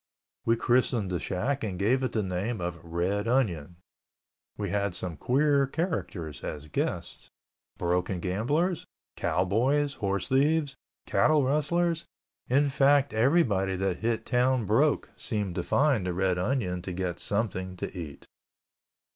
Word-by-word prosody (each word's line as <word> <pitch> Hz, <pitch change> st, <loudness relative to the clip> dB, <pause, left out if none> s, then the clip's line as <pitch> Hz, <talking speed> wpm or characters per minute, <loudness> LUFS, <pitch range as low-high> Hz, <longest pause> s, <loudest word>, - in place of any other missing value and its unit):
We 115 Hz, -, +5 dB
christened 120 Hz, -4 st, +1 dB
the 90 Hz, -, -1 dB
shack 125 Hz, +9 st, -2 dB
and 95 Hz, -4 st, -3 dB
gave 120 Hz, +8 st, +2 dB
it 130 Hz, -, -1 dB
the 110 Hz, -, +1 dB
name 95 Hz, +5 st, -2 dB
of 85 Hz, -2 st, -4 dB
Red 90 Hz, +6 st, -1 dB
Onion. 90 Hz, -, 0 dB, 0.8 s
We 100 Hz, -3 st, -3 dB
had 100 Hz, -2 st, 0 dB
some 90 Hz, -2 st, -4 dB
queer 140 Hz, -, +2 dB
characters 105 Hz, -, -3 dB
as 75 Hz, 0 st, -6 dB
guests. -, -, -3 dB, 0.5 s
Broken 90 Hz, +1 st, 0 dB
gamblers, 145 Hz, -, 0 dB, 0.3 s
cowboys, 130 Hz, +11 st, +1 dB
horse 100 Hz, -4 st, -2 dB
thieves, 145 Hz, +1 st, +2 dB, 0.3 s
cattle 155 Hz, -2 st, +3 dB
rustlers, 165 Hz, +5 st, +1 dB, 0.4 s
in 140 Hz, +3 st, +3 dB
fact, 140 Hz, +1 st, +3 dB
everybody 110 Hz, -, +2 dB
that 95 Hz, -1 st, -1 dB
hit 115 Hz, 0 st, -1 dB
town 125 Hz, -1 st, +2 dB
broke 135 Hz, +9 st, +2 dB
seemed 105 Hz, -6 st, -2 dB
to 90 Hz, -, -2 dB
find 130 Hz, -2 st, +2 dB
the 90 Hz, -, -1 dB
Red 95 Hz, -1 st, +1 dB
Onion 90 Hz, -4 st, -1 dB
to 90 Hz, 0 st, -5 dB
get 90 Hz, -1 st, -3 dB
something 95 Hz, -3 st, -2 dB
to 90 Hz, -, -5 dB
eat. 80 Hz, -6 st, -7 dB
105 Hz, 140 wpm, -28 LUFS, 90-135 Hz, 0.8 s, We